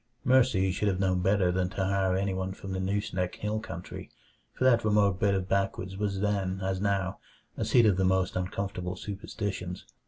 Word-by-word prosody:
Mercy 115 -8 +4
should 105 +3 -1
have 95 -2 0
known 95 -2 +1
better 95 -1 +3
than 90 0 0
to 95 0 -2
hire 95 -1 +1
anyone 95 -1 -1
from 95 0 -8
the 95 - -2
Nooseneck 95 -1 -1
Hill 105 +1 -2
country, 90 -5 -8 0.4
for - - -4
that 120 -3 +5
remote 105 -3 +3
bit 100 -1 +3
of 95 -1 -2
backwoods 95 -1 -1
was 100 -1 -2
then, 100 -2 0
as 95 0 -1
now, 100 -2 0 0.4
a - - -2
seat 120 -2 +4
of 100 -4 +4
the 95 - +2
most 95 0 +1
uncomfortable 90 0 -3
superstitions. 95 -2 -5
95 Hz, 185 wpm, -29 LUFS, 95-100 Hz, 0.4 s, that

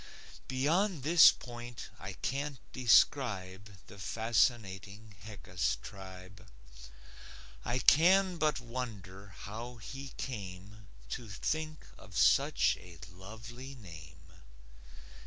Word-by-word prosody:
Beyond 155 +5 +1
this 165 +3 +9
point 120 -1 -9
I 95 0 -6
can't 140 +6 -3 0.2
describe 105 -6 +3 0.2
The 100 - -13
fascinating 105 -1 0
Heckus 90 -4 -2
tribe. 95 +1 -11 1.2
I 120 - 0
can 180 +7 +5
but 155 -4 +1
wonder 110 -6 -6
how 115 +4 -7
he 135 +4 -8
came 100 -3 -7 0.2
To 115 - -5
think 155 +10 -3
of 95 -1 -9
such - - +4
a 90 -2 -13
lovely 115 +8 -10
name. 80 -6 -13
110 Hz, 95 wpm, -32 LUFS, 95-130 Hz, 1.2 s, this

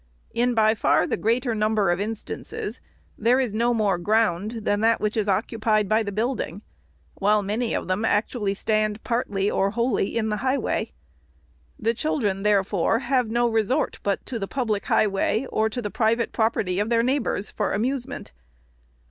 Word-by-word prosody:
" - - -35
In 245 -1 +1
by 220 -1 +4
far 220 - +2
the - - -1
greater 235 +2 0
number 215 -3 +2
of 175 - 0
instances, 215 +1 -5 0.4
there 240 +4 +3
is 250 -6 -1
no 235 +2 +2
more 210 -6 +1
ground 215 +2 +1
than 205 -1 +1
that 225 +1 +3
which 210 0 -1
is 210 -2 0
occupied 215 +1 +1
by 215 +3 +3
the 205 -2 -3
build 230 +4 -1
ing; 200 +6 -7 0.6
while 210 +1 +3
many 225 +4 -1
of - - -3
them 185 +4 -1
actually 210 -1 0
stand 215 +1 0
partly 210 -5 0
or 195 - +1
wholly 235 -1 0
in 220 -1 0
the 210 - -1
highway. 260 +4 -1 0.9
The 225 +1 0
children, 220 -8 -1
therefore, 200 0 +2
have 250 -1 0
no 240 +1 +2
resort 225 +5 0
but 200 -1 -1
to 235 - -4
the 195 - -3
public 220 -6 -2
highway, 210 +3 +1
or 220 0 +1
the 215 -2 -4
private 230 +1 +1
property 205 -5 0
of 210 +2 0
their 230 -1 +3
neighbors, 255 -5 -1
for 210 - -1
amusement. 245 +5 -3
220 Hz, 175 wpm, -24 LUFS, 205-235 Hz, 0.9 s, by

